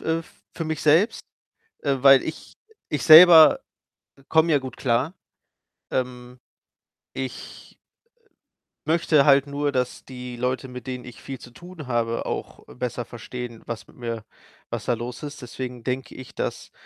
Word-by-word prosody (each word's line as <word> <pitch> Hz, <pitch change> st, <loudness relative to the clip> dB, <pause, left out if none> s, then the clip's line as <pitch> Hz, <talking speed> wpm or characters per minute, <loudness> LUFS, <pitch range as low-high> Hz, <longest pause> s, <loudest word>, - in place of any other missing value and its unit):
äh, 160 Hz, +1 st, -1 dB, 0.3 s
für 165 Hz, -, -3 dB
mich 160 Hz, -1 st, -3 dB
selbst. 160 Hz, +9 st, +2 dB, 0.6 s
Äh, 140 Hz, -2 st, +1 dB
weil 135 Hz, 0 st, +7 dB
ich 160 Hz, -, -8 dB, 0.4 s
ich 150 Hz, -, -2 dB
selber, 160 Hz, 0 st, +9 dB, 0.6 s
äh, 135 Hz, -, -21 dB
komme 160 Hz, +1 st, +4 dB
ja -, -, +5 dB
gut 130 Hz, -1 st, -8 dB
klar. 130 Hz, +6 st, 0 dB, 0.8 s
Ähm, 125 Hz, -1 st, -4 dB, 0.8 s
ich, 130 Hz, -1 st, -8 dB, 1.1 s
äh, -, -, -4 dB
möchte 160 Hz, -4 st, +3 dB
halt 140 Hz, -1 st, +5 dB
nur, 145 Hz, +1 st, -1 dB
dass 125 Hz, -2 st, -3 dB
die 125 Hz, -1 st, -8 dB
Leute, 125 Hz, +1 st, -2 dB
mit 125 Hz, +1 st, -9 dB
denen 125 Hz, -1 st, -5 dB
ich 120 Hz, -2 st, -12 dB
viel 135 Hz, -1 st, -7 dB
zu 120 Hz, -, -13 dB
tun 175 Hz, +2 st, -11 dB
habe 115 Hz, -2 st, -1 dB
auch -, -, -6 dB
besser 125 Hz, -1 st, -4 dB
verstehen, 120 Hz, 0 st, -8 dB
was 115 Hz, -2 st, -6 dB
mit -, -, -20 dB
mir 115 Hz, -3 st, -5 dB, 0.5 s
was -, -, -4 dB
da 125 Hz, -, +1 dB
los 120 Hz, +1 st, -7 dB
ist. 145 Hz, 0 st, -7 dB
Deswegen 125 Hz, -1 st, -7 dB
denke 130 Hz, 0 st, -4 dB
ich, 130 Hz, -, -11 dB
dass -, -, -4 dB
130 Hz, 155 wpm, -24 LUFS, 125-150 Hz, 1.1 s, selber